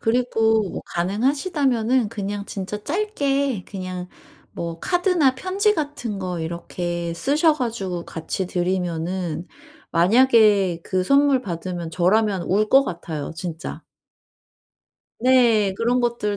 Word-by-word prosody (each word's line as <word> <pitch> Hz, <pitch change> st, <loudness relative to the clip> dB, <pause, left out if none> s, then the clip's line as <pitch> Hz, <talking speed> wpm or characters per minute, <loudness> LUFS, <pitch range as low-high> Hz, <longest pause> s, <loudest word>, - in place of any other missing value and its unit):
그리고 225 Hz, -2 st, +2 dB
뭐 -, -, -5 dB
가능하시다면은 250 Hz, -, 0 dB
그냥 200 Hz, 0 st, -4 dB
진짜 200 Hz, +2 st, -5 dB
짧게 280 Hz, -, -1 dB
그냥 185 Hz, -2 st, -6 dB, 0.5 s
뭐 170 Hz, -1 st, -5 dB
카드나 355 Hz, -7 st, +2 dB
편지 395 Hz, +8 st, +1 dB
같은 285 Hz, -9 st, -3 dB
거 180 Hz, -2 st, -3 dB
이렇게 170 Hz, +1 st, -4 dB
쓰셔 295 Hz, -, +2 dB
가지고 195 Hz, -, -3 dB
같이 170 Hz, +3 st, -4 dB
드리면은 175 Hz, -2 st, -2 dB, 0.5 s
만약에 205 Hz, -2 st, +4 dB
그 185 Hz, -1 st, 0 dB
선물 275 Hz, 0 st, +4 dB
받으면 175 Hz, -2 st, -5 dB
저라면 190 Hz, +3 st, +2 dB
울 210 Hz, +4 st, +1 dB
것 270 Hz, +1 st, +6 dB
같아요 160 Hz, -, -5 dB
진짜. 170 Hz, -2 st, -6 dB, 1.4 s
네. 235 Hz, -5 st, +4 dB
그런 240 Hz, +4 st, +1 dB
것들 235 Hz, -4 st, -1 dB
210 Hz, 240 characters per minute, -22 LUFS, 180-260 Hz, 1.4 s, 것